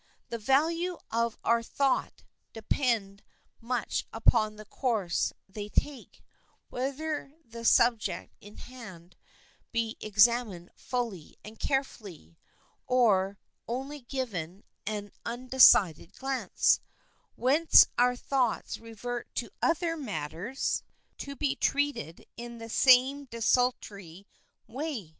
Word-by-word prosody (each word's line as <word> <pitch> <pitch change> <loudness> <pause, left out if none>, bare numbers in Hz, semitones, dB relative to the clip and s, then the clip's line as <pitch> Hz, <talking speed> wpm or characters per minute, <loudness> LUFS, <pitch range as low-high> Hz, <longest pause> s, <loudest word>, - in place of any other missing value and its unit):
The 235 - -4
value 330 +9 +1
of 230 0 0
our 235 0 +3
thoughts 270 +3 -1 0.3
depend 220 -3 -1 0.4
much 240 0 -2
upon 225 -1 +3
the 215 0 -11
course 215 -7 -1 0.2
they 205 +1 -7
take, 280 +3 -3 0.5
whether 280 +3 -3
the 230 0 -10
subject 235 -2 +2
in 205 +1 -14
hand 190 -9 -12 0.6
be 230 -1 -2
examined 210 -3 +2
fully 230 -10 -4
and 215 +1 -12
carefully, 200 - -4 0.5
or 200 -6 +3 0.3
only 270 +5 -4
given 205 - -5 0.2
an 205 -2 -4
undecided 235 - +4
glance, 270 -1 +1 0.6
whence 290 +7 +6
our 250 +1 +3
thoughts 250 -2 -1
revert 230 +2 -6
to - - -3
other 335 0 +1
matters 205 - -3 0.4
to 280 0 -6
be 280 0 0
treated 285 - -1
in 235 0 -8
the 225 0 -9
same 260 +4 +5
desultory 215 -7 -1 0.4
way. 260 - -5
235 Hz, 100 wpm, -29 LUFS, 205-265 Hz, 0.6 s, whence